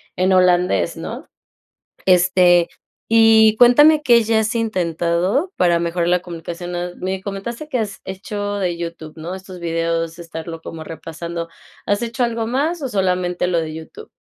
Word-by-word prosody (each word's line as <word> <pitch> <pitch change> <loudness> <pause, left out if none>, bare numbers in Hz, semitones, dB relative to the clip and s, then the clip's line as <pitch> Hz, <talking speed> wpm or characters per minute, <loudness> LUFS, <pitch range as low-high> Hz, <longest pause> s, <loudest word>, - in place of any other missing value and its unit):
en 185 +1 +1
holandés", 180 -1 +3
¿no?, - - -7 0.8
este, 180 -1 +4 0.4
y 220 -1 +6
cuéntame, 295 +6 +6
¿qué 235 -5 +5
ya 220 0 +2
has 220 +1 -1
intentado 185 - 0
para 175 -1 +3
mejorar 170 0 -1
la 180 0 +2
comunicación?, 175 0 -7
ah, 175 0 -3
me 190 +1 -4
comentaste 220 +9 -6
que 265 -5 -1
has 210 -3 -4
hecho 205 +2 -4
de 180 -3 -1
YouTube, 170 -2 -7
¿no?, 165 +3 -6
estos 185 -1 -11
videos, 165 0 -2
estarlo 165 -1 -7
como 160 0 -8
repasando, 165 +1 -6 0.4
¿has 205 +2 0
hecho 235 +1 -1
algo 230 -1 -2
más 300 +7 -1
o 270 - -2
solamente 180 -4 0
lo 175 -2 +1
de 155 -1 -5
YouTube? 160 - -10
180 Hz, 155 wpm, -20 LUFS, 170-220 Hz, 0.8 s, y